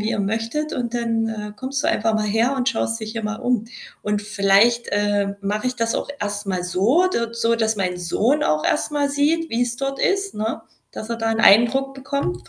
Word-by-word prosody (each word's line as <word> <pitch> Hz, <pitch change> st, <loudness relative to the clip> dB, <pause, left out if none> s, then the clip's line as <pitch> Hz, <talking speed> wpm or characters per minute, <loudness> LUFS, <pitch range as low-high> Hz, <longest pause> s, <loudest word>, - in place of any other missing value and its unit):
wie 215 Hz, +2 st, -1 dB
ihr -, -, -1 dB
möchtet 225 Hz, +9 st, -2 dB
und 240 Hz, -1 st, -3 dB
dann, 230 Hz, -1 st, 0 dB
äh, 210 Hz, -1 st, -5 dB
kommst 260 Hz, +3 st, -3 dB
du -, -, +3 dB
einfach 220 Hz, 0 st, +1 dB
mal 215 Hz, -1 st, 0 dB
her 225 Hz, +6 st, +1 dB
und 255 Hz, -1 st, +1 dB
schaust 225 Hz, -2 st, -1 dB
dich 220 Hz, 0 st, -5 dB
hier 230 Hz, -, -4 dB
mal 215 Hz, +1 st, -3 dB
um.“ 245 Hz, -3 st, 0 dB, 0.4 s
Und 210 Hz, 0 st, -1 dB
vielleicht, 205 Hz, +3 st, +3 dB
äh, 205 Hz, -1 st, 0 dB
mache 210 Hz, +4 st, -1 dB
ich 250 Hz, -, -5 dB
das 230 Hz, 0 st, 0 dB
auch -, -, -2 dB
erst 205 Hz, 0 st, -3 dB
mal 185 Hz, -2 st, -2 dB
so 210 Hz, -, +2 dB
d 235 Hz, -10 st, -1 dB
so, 230 Hz, 0 st, +1 dB
dass 220 Hz, -1 st, 0 dB
mein 180 Hz, -2 st, -1 dB
Sohn 225 Hz, -, +1 dB
auch 155 Hz, 0 st, +1 dB
erst -, -, +1 dB
mal 290 Hz, -1 st, 0 dB
sieht, 300 Hz, +4 st, +1 dB
wie's 240 Hz, +1 st, 0 dB
dort 275 Hz, +1 st, -3 dB
ist, 390 Hz, 0 st, +1 dB
ne, 220 Hz, +1 st, -3 dB, 0.3 s
dass 215 Hz, +2 st, -7 dB
er 230 Hz, -, -1 dB
da 225 Hz, 0 st, -1 dB
'n 225 Hz, -, -1 dB
Eindruck 240 Hz, +6 st, +5 dB
bekommt 260 Hz, -, -4 dB
225 Hz, 220 wpm, -21 LUFS, 205-255 Hz, 0.4 s, Eindruck